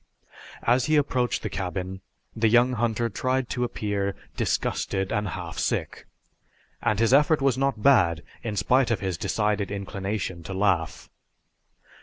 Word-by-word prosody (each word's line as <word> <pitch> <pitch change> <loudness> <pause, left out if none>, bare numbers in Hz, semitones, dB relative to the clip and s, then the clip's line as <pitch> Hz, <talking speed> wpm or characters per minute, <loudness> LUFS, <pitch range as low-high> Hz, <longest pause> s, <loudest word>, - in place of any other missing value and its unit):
As 125 +1 +3
he 155 - +2
approached 130 -5 +1
the - - -2
cabin 95 0 -4 0.3
the 110 0 +2
young 120 +2 +4
hunter 115 0 0
tried 130 +3 -1
to 125 - -1
appear 100 -4 -2 0.2
disgusted 95 0 -1
and 105 0 0
half 85 -3 -5
sick, - - -2 0.7
and 105 - +1
his 115 +2 +3
effort 150 +3 +5
was 135 -2 +2
not 135 -5 -1
bad 90 - +4 0.2
in 110 -4 -4
spite 125 +6 +3
of 115 - 0
his 95 -2 -1
decided 105 +3 -1
inclination 100 -2 -4
to 95 +4 -6
laugh. 95 -5 0
105 Hz, 145 wpm, -26 LUFS, 95-125 Hz, 0.7 s, effort